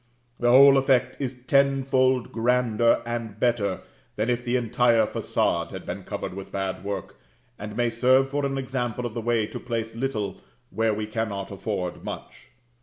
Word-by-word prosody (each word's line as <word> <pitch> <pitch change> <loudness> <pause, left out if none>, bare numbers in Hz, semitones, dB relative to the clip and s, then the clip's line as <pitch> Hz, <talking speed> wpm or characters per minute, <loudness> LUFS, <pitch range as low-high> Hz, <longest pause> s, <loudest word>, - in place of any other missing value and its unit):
The 120 - +2
whole 135 +2 +8
effect 130 -2 +2
is 125 -2 -5
tenfold 130 -2 +2
grander 115 -1 +2
and 115 -3 -5
better 115 -6 0 0.3
than 110 +3 0
if 120 0 -1
the 120 0 -1
entire 120 -1 +3
façade - - -1
had - - -8
been - - -6
covered - - -5
with 95 0 -8
bad 95 -1 -3
work, 100 0 -5 0.4
and 105 +1 -7
may 120 -1 +1
serve 130 +3 +4
for 145 0 -1
an 135 0 -1
example 125 -2 -3
of 120 - -4
the 115 - -3
way 115 -1 +1
to - - -7
place 115 -2 -4
little 115 -5 -3 0.3
where 110 -1 +1
we 105 0 -3
cannot 105 -3 -3
afford 95 -2 -4
much. - - -8
120 Hz, 170 wpm, -25 LUFS, 110-130 Hz, 0.4 s, whole